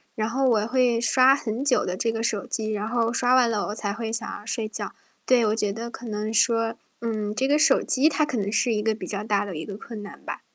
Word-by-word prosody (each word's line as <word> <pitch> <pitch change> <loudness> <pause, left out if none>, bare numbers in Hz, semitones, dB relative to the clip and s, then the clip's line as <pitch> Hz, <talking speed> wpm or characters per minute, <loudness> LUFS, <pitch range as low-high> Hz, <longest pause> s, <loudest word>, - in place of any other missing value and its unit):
然 215 0 -1
后 265 +3 +1
我 220 -3 +2
会 245 -2 +2
刷 255 +2 +5
很 240 0 -4
久 270 - +3
的 180 +1 -3
这 230 - 0
个 225 0 -3
手 210 -3 -1
机， 220 -1 -2
然 210 0 -2
后 230 0 0
刷 250 0 +2
完 250 -2 +4
了 215 -3 -1
我 205 - -4
才 205 -2 -3
会 225 0 -4
想 230 - -2
要 210 - -15
睡 225 -1 -2
觉。 - - -6 0.3
对， 245 -3 +4
我 215 - +1
觉 210 -3 0
得 230 +2 -6
可 235 - -10
能 215 0 -3
说， 230 +1 +2 0.3
嗯， 215 -2 -2
这 265 - +1
个 290 +2 +3
手 300 -3 +4
机 270 +4 +3
它 305 0 +1
可 290 -5 -3
能 205 -1 -1
是 235 +1 +2
一 210 - 0
个 220 0 +2
比 215 - -7
较 200 0 -3
大 205 -2 +1
的 195 -4 -6
一 155 - -5
个 200 - -7
困 215 0 -8
难 205 - -10
吧。 - - -6
225 Hz, 290 characters per minute, -25 LUFS, 210-245 Hz, 0.3 s, 刷